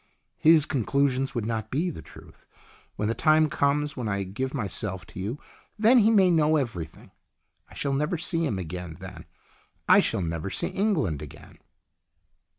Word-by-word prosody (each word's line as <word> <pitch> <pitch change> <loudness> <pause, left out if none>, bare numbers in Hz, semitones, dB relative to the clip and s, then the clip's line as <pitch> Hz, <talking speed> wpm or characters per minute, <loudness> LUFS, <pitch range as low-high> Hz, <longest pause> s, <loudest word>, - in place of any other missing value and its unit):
" - - -51
His 160 -3 +6
conclusions 135 0 0
would 115 -3 -2
not 110 -1 -3
be 165 +8 -1
the - - -9
truth. - - -16 0.5
When 105 - -2
the 115 - 0
time 155 +3 +3
comes 145 +1 0
when 125 -4 -4
I 100 -1 -1
give 120 +8 -4
myself 100 - -3
to - - -11
you 105 +8 -3 0.4
then 225 +4 +5
he 220 0 +4
may 195 -5 +5
know 155 -2 +3
everything. 95 - -4 0.6
I - - -15
shall 140 -1 -2
never 150 +5 0
see 165 +1 -1
him 115 -11 -1
again 90 -2 -6
then. 95 -3 -10 0.6
I - - +7
shall 95 - 0
never 85 +2 -3
see - - -2
England 150 - 0
again." 75 - -12
130 Hz, 170 wpm, -26 LUFS, 95-155 Hz, 0.6 s, I